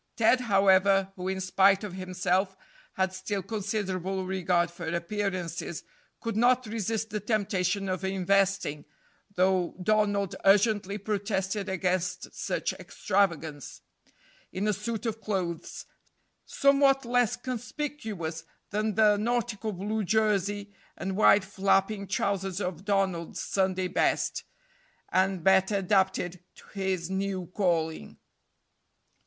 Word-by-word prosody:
Ted, 235 +3 +4
however, 195 -2 +4
who, 185 0 -5
in 190 0 -2
spite 195 +1 +3
of 205 -3 -5
himself, 185 +1 -1 0.4
had 190 0 0
still 190 +1 -3
considerable 195 -2 -2
regard 180 -2 +1
for 170 - -7
appearances, 170 -1 -3 0.4
could 230 -3 -4
not 250 +3 +3
resist 220 0 -2
the 210 - -2
temptation 195 -2 0
of 185 0 -2
investing 190 -4 +1 0.5
though 185 -1 +2
Donald 205 -1 +1
urgently 200 0 +3
protested 200 -1 -2
against 180 -1 -1
such - - -2
extravagance 165 -7 -2 0.7
in 195 +3 -2
a 210 - +2
suit 230 +4 -4
of 225 -1 -3
clothes, 185 -6 -3 0.6
somewhat 275 -1 +3
less 245 -2 +2
conspicuous 225 - -5 0.3
than 215 0 -1
the 210 -1 +5
nautical 230 -1 -1
blue 210 +3 -2
jersey 205 -1 0 0.2
and 190 0 -3
wide 200 -1 +5
flapping 195 +1 +1
trousers 195 -1 -1
of 180 -1 -4
Donald's 190 -5 0
Sunday 190 -1 0
best, - - 0 0.7
and 190 -2 +1
better 190 +2 +4
adapted 190 -2 +1
to - - -16
his 190 -3 -2
new 190 -1 -2
calling. 165 -5 -1
195 Hz, 115 wpm, -28 LUFS, 185-210 Hz, 0.7 s, the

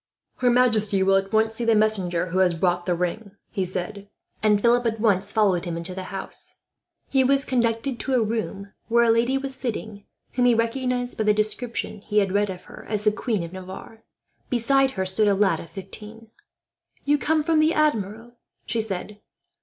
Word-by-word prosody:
"Her 250 - +2
majesty 220 -5 +3
will 195 0 +4
at 195 0 0
once 220 0 +2
see 235 - -3
the 230 -1 +3
messenger 190 -5 +1
who 185 +2 0
has 180 -2 +3
brought 175 +1 0
the 175 - +2
ring," 185 +4 -3 0.2
he 195 -4 -1
said, 195 +3 -5 0.3
and 210 -1 +3
Philip 240 +2 +3
at 225 -1 -2
once 205 -2 +2
followed 200 -5 +2
him 170 -1 -3
into 170 +2 -6
the 185 0 -6
house. 195 0 -8 0.5
He 270 -1 +2
was 275 +2 +3
conducted 235 0 0
to 265 - -1
a 240 - +3
room 210 -3 -4 0.2
where 235 +1 +4
a 230 - +4
lady 240 +4 +2
was 270 0 -4
sitting 220 -5 -5 0.3
whom 250 0 +1
he 245 -1 +5
recognized, 245 +1 -1
by 220 - +1
the 210 0 +4
descriptions 215 -1 -2
he 210 - -1
had 200 -2 +3
read 205 +1 +1
of 185 -1 -7
her, - - -12
as 210 -1 -1
the 210 - +4
Queen 215 -3 -2
of 170 +1 -8
Navarre. 190 +4 -10 0.5
Beside 270 +3 +3
her 190 - 0
stood 200 +3 +1
a 200 - +3
lad 190 -5 +2
of 170 - -10
fifteen. 215 +3 -11 0.7
"You 290 +1 +3
come 310 0 +1
from 320 0 +2
the 310 +2 +3
Admiral!" 235 -5 -1 0.3
she 225 +1 -1
said. 210 0 -5
215 Hz, 200 wpm, -24 LUFS, 195-240 Hz, 0.7 s, he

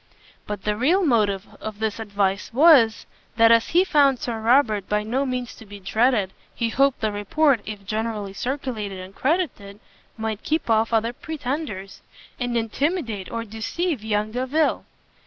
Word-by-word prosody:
But 205 -2 -5
the 210 0 0
real 335 - +2
motive 210 -7 +2 0.2
of 215 -1 -6
this 220 0 -2
advice 200 -2 -1
was, 260 -5 +5 0.3
that 225 0 +6
as 230 0 +5
he 355 +2 +4
found 285 -7 +3
Sir 235 -2 -4
Robert 220 -4 +3
by 210 0 +1
no 260 +6 -1
means 250 -2 -3
to - - -12
be 205 -1 -11
dreaded, 210 0 +1 0.2
he 230 - -1
hoped 275 +3 +2
the 215 -1 0
report, 235 +5 +2
if 205 -2 -7
generally 215 -1 -3
circulated 240 -5 -4
and 185 +1 -9
credited, 260 - -2 0.4
might 220 -1 -3
keep 310 -6 -1
off 220 +1 +2
other 230 +1 +1
pretenders, 255 -9 -5 0.4
and 245 -1 -1
intimidate 230 - -2
or 230 0 -3
deceive 230 - -3
young 215 0 -1
Delvile. 260 +6 0
225 Hz, 155 wpm, -23 LUFS, 210-270 Hz, 0.4 s, that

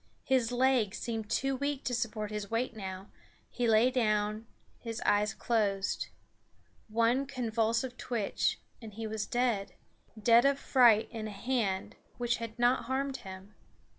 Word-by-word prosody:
His 255 -3 +2
legs 245 -4 +2
seemed 225 -3 -4
too 270 +3 0
weak 285 0 -2
to 250 - -2
support 220 -3 -2
his 210 -1 -4
weight 235 +1 -1
now; 190 -1 -7 0.4
he 245 -1 -1
lay 225 +3 +5
down; 215 -2 0 0.3
his 230 -1 -5
eyes 210 +1 +3
closed. 200 -4 0 0.8
One 230 +5 +2
convulsive 235 0 -1
twitch 230 -5 -1 0.2
and 215 -3 -10
he 225 0 -5
was 215 -1 -3
dead 240 -6 0 0.4
dead 230 +2 +6
of 275 0 +3
fright 240 -6 +5
in 220 -2 -5
a - - -6
hand 200 -2 -2 0.2
which 240 -1 0
had 230 -1 -7
not 245 +1 +2
harmed 270 +1 -1
him. 190 +2 -10
230 Hz, 145 wpm, -31 LUFS, 210-250 Hz, 0.8 s, dead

